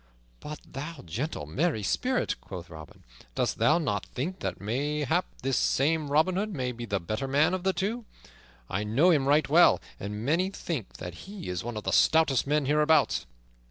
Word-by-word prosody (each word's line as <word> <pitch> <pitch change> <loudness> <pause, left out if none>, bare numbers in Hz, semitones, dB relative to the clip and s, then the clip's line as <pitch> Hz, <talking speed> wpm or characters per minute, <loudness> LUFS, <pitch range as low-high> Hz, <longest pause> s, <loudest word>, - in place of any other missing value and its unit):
"But 150 0 -7
thou 150 +3 -7
gentle, 95 - -4
merry 125 - 0
spirit," 255 - 0
quoth 90 -2 -9
Robin, 80 -1 -12 0.3
"dost - - 0
thou 120 +8 +4
not 105 - -1
think 175 +9 -5
that - - -4
mayhap 145 - 0 0.2
this 135 0 +1
same 150 +2 +1
Robin 160 +6 +3
Hood 210 +2 -1
may 125 -3 -1
be 120 -1 -6
the 100 -1 0
better 110 +9 -3
man 150 +6 +3
of 185 -1 -2
the 190 - +3
two? 210 +6 -2 0.6
I 100 +8 -2
know 130 +13 +4
him 140 -5 +2
right 150 +2 +4
well, 170 +5 +6 0.2
and 105 +3 -5
many 170 +7 +2
think 160 - -5
that 90 +1 -7 0.2
he 200 - -7
is 90 -1 -3
one 120 -1 -5
of 105 - -5
the - - -1
stoutest 155 -6 +4
men 150 0 +2
hereabouts." 150 - +3
145 Hz, 185 wpm, -28 LUFS, 110-165 Hz, 0.6 s, well